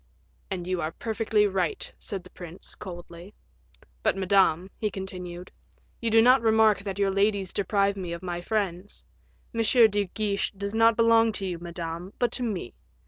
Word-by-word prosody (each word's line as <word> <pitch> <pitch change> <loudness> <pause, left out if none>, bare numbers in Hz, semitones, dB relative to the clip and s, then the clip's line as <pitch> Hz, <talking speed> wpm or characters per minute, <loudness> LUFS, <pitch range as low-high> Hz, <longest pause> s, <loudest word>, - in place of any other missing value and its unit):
"And 180 -3 -4
you 185 -1 -1
are 155 0 -3
perfectly 220 -1 +1
right," 385 - -1
said 195 -5 -6
the 180 - -15
prince, 175 0 -10
coldly. 175 0 -10 0.7
"But, - - +1
Madame," 190 -2 +2
he 215 - 0
continued, 180 -2 -7 0.5
"you 230 - 0
do 225 0 +6
not 250 +1 +6
remark 220 -3 +4
that 195 -1 -5
your 200 -1 +2
ladies 200 -1 +1
deprive 200 0 +1
me 185 -3 -5
of 170 +2 -6
my 175 -1 -3
friends; 195 -1 -3 0.5
M. 230 - 0
de 220 -3 +4
Guiche 200 +1 -2
does 200 +1 -5
not 225 0 +4
belong 230 -1 +5
to 200 - -1
you, 180 -3 -3
Madame, 170 +2 -6
but 245 - +1
to - - -3
me. 205 - -3
200 Hz, 170 wpm, -27 LUFS, 180-220 Hz, 0.7 s, do